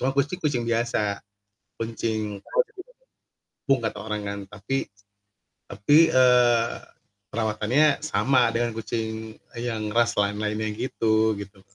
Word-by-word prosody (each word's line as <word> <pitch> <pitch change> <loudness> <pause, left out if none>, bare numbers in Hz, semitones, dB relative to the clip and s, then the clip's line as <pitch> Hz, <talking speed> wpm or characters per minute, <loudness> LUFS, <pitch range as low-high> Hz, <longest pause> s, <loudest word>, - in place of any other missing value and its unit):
cuma 130 - +1
kucing-kucing 145 -4 0
biasa. 115 -3 0 0.6
Kucing 110 -3 -3 1.0
kampung 135 -2 0
kata 110 -3 -3
orang 105 -1 -4
kan. 100 0 -4
Tapi, 105 +6 -3 0.8
tapi, 150 +11 +4
eee, 125 -2 +5 0.6
perawatannya 115 +7 +1
sama 130 -4 +2
dengan 115 0 -1
kucing 110 -1 -4 0.2
yang 110 -3 -3
ras 115 -2 +2
lain-lainnya 105 +1 0
gitu 110 -2 +1
gitu. 100 -1 -10
115 Hz, 100 wpm, -25 LUFS, 105-125 Hz, 1.0 s, eee